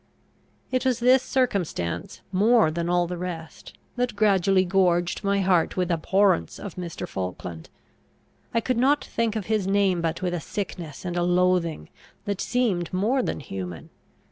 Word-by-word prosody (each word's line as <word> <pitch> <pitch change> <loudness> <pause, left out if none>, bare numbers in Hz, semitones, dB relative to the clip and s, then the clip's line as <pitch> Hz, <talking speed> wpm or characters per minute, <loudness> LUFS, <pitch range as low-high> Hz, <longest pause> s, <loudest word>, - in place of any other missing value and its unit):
It 255 -1 +1
was 260 -3 +2
this 250 +2 +5
circumstance, 200 - -2
more 210 -1 +4
than 170 +1 -2
all 175 0 +2
the 175 0 -5
rest, 165 -3 -7 0.2
that 245 -2 -1
gradually 195 -2 +3
gorged 175 -1 +1
my 200 0 +1
heart 185 -3 +2
with 180 -1 0
abhorrence 170 - +2
of 200 - -7
Mr. 175 -3 -6
Falkland. 90 -3 -6 0.8
I 230 - +1
could 255 +1 -1
not 275 +4 +3
think 230 -2 -1
of 215 -4 -3
his 215 -3 0
name 195 -3 +2
but 165 +2 -2
with 180 -1 0
a 175 - -1
sickness 175 -6 -6
and 175 -1 -3
a 175 - +1
loathing 175 - +1 0.4
that 200 -2 -2
seemed 215 -9 0
more 215 +8 +1
than 235 - -3
human. 90 - -7
185 Hz, 160 wpm, -25 LUFS, 170-210 Hz, 0.8 s, this